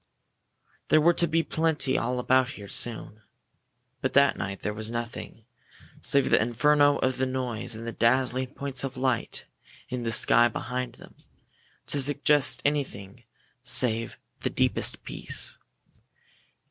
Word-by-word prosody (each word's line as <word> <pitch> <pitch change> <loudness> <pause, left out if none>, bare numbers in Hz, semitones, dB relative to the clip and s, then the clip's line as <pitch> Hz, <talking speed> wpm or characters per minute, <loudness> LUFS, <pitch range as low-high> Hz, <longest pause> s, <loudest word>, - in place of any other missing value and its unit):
There 155 - +4
were 170 +3 +4
to 170 - +2
be 165 +1 +1
plenty 160 -5 +1
all 125 +2 -1
about 130 +1 +1
here 100 -5 -11
soon. 110 -1 -4 0.8
But - - -2
that 140 -1 +4
night 100 -1 -6
there 105 - -3
was 110 +1 -2
nothing, 115 -1 -7 0.6
save 140 -1 +2
the - - +4
inferno 145 +5 +3
of 130 -1 -1
noise 130 -4 -3
and 115 +1 -8
the 115 - -4
dazzling 130 +2 +1
points 135 -2 -4
of 135 -1 -5
light 130 -2 -1 0.4
in 125 -1 -4
the 115 -1 -2
sky 120 +1 +5
behind 125 +1 -5
them, - - -16 0.7
to 145 - +2
suggest 145 0 +3
anything 120 -7 -3 0.4
save 120 -2 0 0.2
the - - -2
deepest - - +1
peace. - - -3
125 Hz, 135 wpm, -26 LUFS, 115-140 Hz, 0.8 s, sky